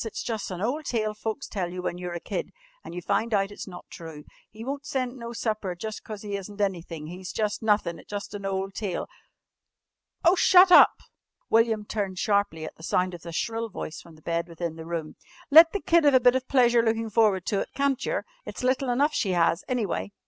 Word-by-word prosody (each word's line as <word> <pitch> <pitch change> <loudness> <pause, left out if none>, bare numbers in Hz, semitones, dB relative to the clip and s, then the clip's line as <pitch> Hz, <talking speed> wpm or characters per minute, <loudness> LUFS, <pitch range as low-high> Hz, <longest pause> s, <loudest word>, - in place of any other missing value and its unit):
It's 225 - -5
jus' 225 -3 -3
an' 185 0 -4
ole 260 +8 0
tale 220 -7 -1
folks 220 +4 -4
tell 180 -4 -3
you 180 0 -6
when 175 - -3
you're 180 -1 -5
a - - -3
kid, 485 - -4 0.3
an' - - -9
you 180 0 -6
find 225 +4 +1
out 195 0 +1
it's 205 - -8
not 180 -2 -10
true. 160 -3 -9 0.3
He 220 +2 -10
won't 280 +2 -4
send 255 -3 -2
no 235 -2 -7
supper 215 -5 -2
jus' 215 +4 -5
cause 215 -2 -9
he 205 -1 -4
isn't 200 +1 -9
anythin'. 170 -6 -2
He's 180 +3 -7
jus' 210 -1 -1
nothin' 210 -6 +1
jus' 205 0 -6
an 205 -1 -6
ole 195 0 -2
tale 195 -2 -3 0.6
" - - -23
"Oh, 340 - +7
shut 370 0 +6
up!" - - +9 0.6
William 225 -2 +3
turned 200 -3 -3
sharply 200 -6 0
at - - -8
the - - -15
sound 180 +2 0
of 175 - -8
the 170 - -8
shrill 225 +6 -2
voice 160 -5 -6
from 165 -2 -15
the 155 - -20
bed 170 0 -1
within 170 -1 -5
the 160 0 -9
room. 165 -2 -4 0.3
"Let 325 +2 +9
the 405 - -2
kid 340 -3 +3
'ave 285 -3 +6
a - - +3
bit 245 0 +5
of 260 0 -1
pleasure 240 -3 +4
lookin' 225 -1 -1
forward 210 -5 +3
to 200 - 0
it, - - -3
can't 275 -2 +1
yer? - - -2 0.2
It's - - -7
little 255 +1 +1
enough 285 +5 +2
she 190 -9 0
'as, 170 +1 +2
anyway." 215 -5 -2
210 Hz, 225 wpm, -26 LUFS, 180-240 Hz, 0.6 s, up